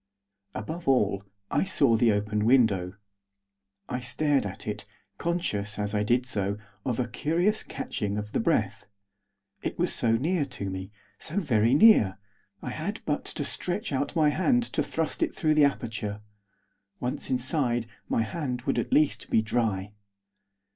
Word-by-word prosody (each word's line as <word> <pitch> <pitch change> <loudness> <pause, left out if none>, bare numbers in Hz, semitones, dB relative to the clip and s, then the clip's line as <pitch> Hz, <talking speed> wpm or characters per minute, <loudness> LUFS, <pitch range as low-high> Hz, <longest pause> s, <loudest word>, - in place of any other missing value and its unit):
Above 160 +10 -5
all, 105 -7 +3 0.3
I - - +2
saw 140 -10 +3
the 115 0 +4
open 105 +1 0
window. 100 -8 +3 0.9
I 125 - -2
stared 130 0 +1
at 95 - -7
it, - - -3 0.4
conscious, 105 - -1
as 105 0 -1
I 105 - +1
did 120 +4 +2
so, 100 -5 -1 0.3
of 125 -2 -1
a 125 - 0
curious 170 - +1
catching 105 -1 -4
of 105 0 -5
the - - 0
breath. - - 0 0.7
It - - -4
was - - +1
so 115 -1 +3
near 155 +8 +1
to 100 -8 -5
me; 95 0 -5 0.3
so 170 +5 -2
very 120 - +3
near. 145 - +6 0.5
I - - -4
had - - -4
but - - -1
to - - -3
stretch 185 +3 -2
out 140 +4 -1
my 155 -2 +4
hand 245 - +2
to - - +1
thrust 160 -1 -2
it - - 0
through 155 -1 +2
the 150 -1 +6
aperture. 110 -6 -2 0.8
Once 125 +1 -2
inside, 125 -2 0 0.2
my 115 - +2
hand 125 -1 -3
would 135 - 0
at - - -3
least 150 -1 +2
be 110 - +3
dry. 105 -3 -1
125 Hz, 160 wpm, -27 LUFS, 105-150 Hz, 0.9 s, near